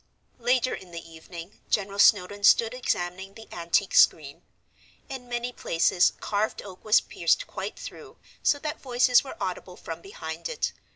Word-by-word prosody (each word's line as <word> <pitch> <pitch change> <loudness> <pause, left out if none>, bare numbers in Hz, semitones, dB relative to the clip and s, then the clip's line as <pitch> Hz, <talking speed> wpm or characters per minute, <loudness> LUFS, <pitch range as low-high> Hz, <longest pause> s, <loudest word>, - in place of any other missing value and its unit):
Later 250 +1 +1
in 185 - -8
the 170 -1 -9
evening 170 +3 -11
General 200 -1 -1
Snowdon 205 0 +4
stood 225 +3 +5
examining 190 -5 -3
the 225 0 -12
antique 170 +3 0
screen. 145 -3 +4 0.7
In 255 -2 -8
many 240 0 -3
places 175 -3 +2
carved 210 +1 -2
oak 190 -2 -12
was 215 0 +5
pierced - - 0
quite - - -6
through, - - -10 0.2
so 290 - +3
that 300 +1 -5
voices 250 -1 +4
were 270 - -9
audible 180 0 -5
from 165 0 -7
behind 160 -4 -7
it. 480 - -2
200 Hz, 155 wpm, -26 LUFS, 175-245 Hz, 0.7 s, stood